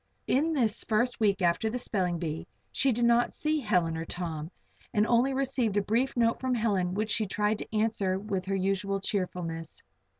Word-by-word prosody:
In 315 +5 +2
this 230 -7 +1
first 240 +4 0
week 200 -3 +2
after 175 +6 +2
the 240 - -2
spelling 185 -8 0
bee 160 -2 -4 0.2
she 270 - +2
did 240 0 +1
not 235 0 +3
see 305 0 0
Helen 180 - +1
or 160 - -3
Tom, 165 -2 -4 0.5
and 210 0 +4
only 240 +4 +3
received 260 -6 0
a - - +4
brief 240 +6 0
note 230 -1 +2
from 260 -1 0
Helen 195 -6 0
which 215 +1 -1
she 215 -1 +1
tried 210 +2 0
to - - -7
answer 210 -4 +1
with 195 -2 -3
her 195 0 -1
usual 195 +1 0
cheerfulness. 175 -5 -3
210 Hz, 190 wpm, -29 LUFS, 185-235 Hz, 0.5 s, and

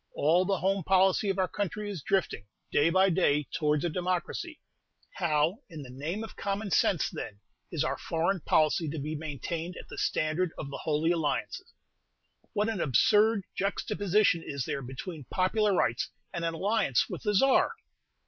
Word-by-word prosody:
All 170 +5 +3
the 195 0 +1
home 195 +1 0
policy 190 +3 +3
of 195 - 0
our 190 -1 +2
country 205 +2 -3
is 195 -6 -5
drifting, 180 - -1 0.2
day 150 +3 +4
by 190 +2 +4
day, 150 -5 +2
towards 150 0 +1
a - - +3
democracy: 185 - -3 0.6
how, 165 +3 +1
in 155 -3 -8
the 125 - -10
name 160 - -4
of 225 - -9
common 200 0 -3
sense, 175 -2 +3
then, 100 -1 -7 0.3
is - - 0
our - - -2
foreign 170 +4 0
policy 155 0 +2
to 160 - -5
be 150 +2 -3
maintained 160 +3 -5
at - - -10
the - - -7
standard 155 +3 0
of 140 -2 -6
the - - -6
Holy 155 +2 +1
Alliance? 145 -7 -1 0.9
What 210 +1 +1
an 220 -5 -2
absurd 205 - +4
juxtaposition 200 -2 +1
is 140 -3 -4
there 140 - -3
between 130 +4 -7
popular 205 - +1
rights 120 - +1 0.2
and 170 - -3
an 165 0 -1
alliance 200 - +1
with - - -6
the 210 -2 0
Czar! 270 +6 +4
175 Hz, 170 wpm, -29 LUFS, 150-195 Hz, 0.9 s, day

